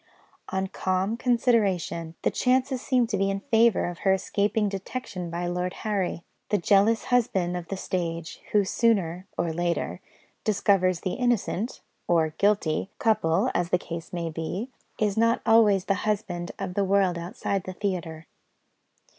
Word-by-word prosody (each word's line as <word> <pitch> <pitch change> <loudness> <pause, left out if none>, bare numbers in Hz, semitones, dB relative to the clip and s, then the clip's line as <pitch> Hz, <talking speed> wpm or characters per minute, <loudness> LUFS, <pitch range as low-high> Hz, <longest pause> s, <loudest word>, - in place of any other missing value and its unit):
On 190 0 -1
calm 190 +2 -1
consideration, 210 -9 +1
the - - +2
chances 255 0 +1
seemed 250 -3 +2
to 205 - 0
be 195 +1 +1
in 195 0 -1
favour 225 +1 +3
of 175 -1 -5
her 190 - +3
escaping 205 +2 0
detection 195 -2 -5
by 170 +1 -3
Lord 180 +1 -2
Harry. 195 -5 -1 0.3
The 210 - +3
jealous 205 +5 +3
husband 190 -8 +2
of 175 -1 -5
the 195 - -4
stage, 170 -3 -3
who 205 -2 +3
sooner 190 -5 +1
(or 170 -1 0
later) 170 +1 -2 0.4
discovers 195 -4 +2
the 185 - -2
innocent 240 -2 -1 0.3
(or 165 -2 +3
guilty) 200 -4 +1
couple, 165 -8 +2
as 175 -1 0
the 180 - +3
case 170 -1 -7
may 170 -2 -3
be, 180 +10 -4 0.3
is 210 -1 0
not 230 +1 +3
always 210 -4 +5
the 195 - +2
husband 195 -5 -2
of 190 -2 -4
the 200 - +1
world 190 -3 +2
outside 185 +2 -3
the 185 - -5
theatre. 170 -5 -3
195 Hz, 155 wpm, -26 LUFS, 175-215 Hz, 0.4 s, always